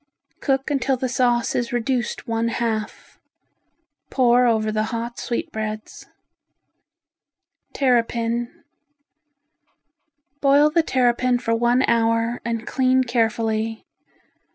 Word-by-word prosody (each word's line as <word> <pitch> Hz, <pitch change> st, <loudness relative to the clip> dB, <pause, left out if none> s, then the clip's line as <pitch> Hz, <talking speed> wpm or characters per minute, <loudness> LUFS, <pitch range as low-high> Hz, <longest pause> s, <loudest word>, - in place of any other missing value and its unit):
Cook 270 Hz, +1 st, -1 dB
until 270 Hz, -1 st, 0 dB
the 255 Hz, -, -2 dB
sauce 240 Hz, -1 st, +1 dB
is 240 Hz, -1 st, -2 dB
reduced 240 Hz, 0 st, -2 dB
one 230 Hz, 0 st, 0 dB
half. 225 Hz, -2 st, -4 dB, 0.9 s
Pour 250 Hz, -1 st, +3 dB
over 220 Hz, -2 st, +1 dB
the 215 Hz, 0 st, 0 dB
hot 235 Hz, +1 st, -5 dB
sweetbreads. 215 Hz, -2 st, -5 dB, 1.7 s
Terrapin 235 Hz, -2 st, 0 dB, 1.8 s
Boil 285 Hz, +2 st, +4 dB
the 335 Hz, +2 st, +3 dB
terrapin 250 Hz, -3 st, +1 dB
for 230 Hz, -1 st, -2 dB
one 240 Hz, +2 st, +2 dB
hour, 230 Hz, +1 st, +1 dB
and 230 Hz, -1 st, -3 dB
clean 260 Hz, 0 st, +2 dB
carefully. 225 Hz, -2 st, -1 dB
235 Hz, 95 wpm, -22 LUFS, 230-255 Hz, 1.8 s, Boil